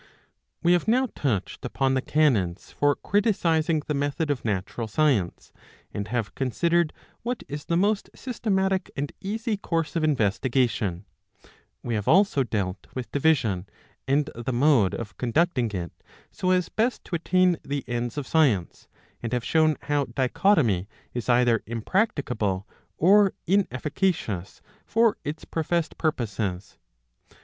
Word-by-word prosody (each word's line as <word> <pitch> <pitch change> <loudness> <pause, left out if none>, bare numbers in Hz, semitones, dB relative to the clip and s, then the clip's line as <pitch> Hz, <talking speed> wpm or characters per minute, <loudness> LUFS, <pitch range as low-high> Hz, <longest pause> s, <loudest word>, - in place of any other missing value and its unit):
We 175 +1 +5
have 175 - +1
now 255 +3 +3
touched 105 - -2
upon 135 -1 0
the 130 - +1
canons 115 - +1
for 145 -1 +2
criticising 165 -7 +1
the 150 - -1
method 145 +2 -1
of 135 - -3
natural 105 +2 -2
science, 115 - 0 0.4
and 100 0 -3
have 110 -3 -2
considered 170 +5 +1 0.3
what 245 +1 -3
is 145 0 -6
the 170 - +1
most 205 +3 +1
systematic 195 -6 -1
and 140 +1 -2
easy 220 +2 -2
course 165 -4 -2
of 165 - 0
investigation; 115 - +1 0.8
we 120 - -2
have 105 -2 -2
also 190 -4 +4
dealt 100 -6 -2
with 130 -2 -5
division, 130 - +1 0.4
and 140 +2 +2
the 120 +2 -4
mode 125 -6 +3
of 105 -4 -7
conducting 125 -1 +1
it 90 -4 -4 0.4
so 185 - -2
as 180 -2 +2
best 235 +3 -1
to - - -4
attain 180 +1 +2
the 140 -1 -3
ends 120 +2 -3
of 145 - -2
science, 125 - +1 0.3
and 115 0 -4
have 125 -1 -1
shown 155 -1 +3
how 145 -1 +1
dichotomy 125 - +2 0.2
is 120 0 -4
either 120 -2 +4
impracticable 115 - -1 0.3
or 195 +3 +5
inefficacious 150 - -1 0.2
for 225 -1 +2
its 150 +2 -5
professed 165 0 -1
purposes. 100 - -2
145 Hz, 135 wpm, -25 LUFS, 115-170 Hz, 0.8 s, We